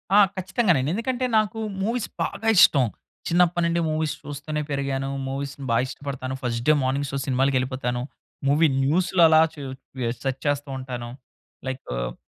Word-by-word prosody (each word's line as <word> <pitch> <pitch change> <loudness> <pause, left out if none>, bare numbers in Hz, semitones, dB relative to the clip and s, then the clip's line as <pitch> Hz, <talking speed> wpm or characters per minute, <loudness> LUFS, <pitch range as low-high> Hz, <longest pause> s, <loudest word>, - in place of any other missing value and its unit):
ఆ! - - +8 0.2
ఖచ్చితంగానండి 185 - +1
ఎందుకంటే 245 +4 -1
నాకు 215 0 0 0.2
మూవీస్ 230 +2 -1 0.2
బాగా 225 - -4
ఇష్టం 135 -6 +7 0.4
చిన్నప్పటి 175 0 +3
నుండి 170 0 +1
మూవీస్ 155 -1 0
చూస్తూనే 145 +1 -4
పెరిగాను. 135 -1 -1 0.2
మూవీస్ 135 +1 -4 0.2
బాగా 115 +2 +3
ఇష్టపడతాను. 130 -1 -5
First 120 -1 -2
day - - +8
morning 135 +2 0
show 140 - -2
సినిమాలకెళ్ళిపోతాను. 130 -2 0 0.5
Movie 150 +4 +4 0.2
న్యూస్‌లో 175 +5 +3
అలా 160 0 +7
చు 145 - -9 0.6
సెర్చ్ 135 0 -2
చేస్తుంటాను. 130 -4 -3 0.6
లైక్ 130 0 -4
ఆహ్, - - -3
140 Hz, 135 wpm, -24 LUFS, 130-170 Hz, 0.6 s, ఆ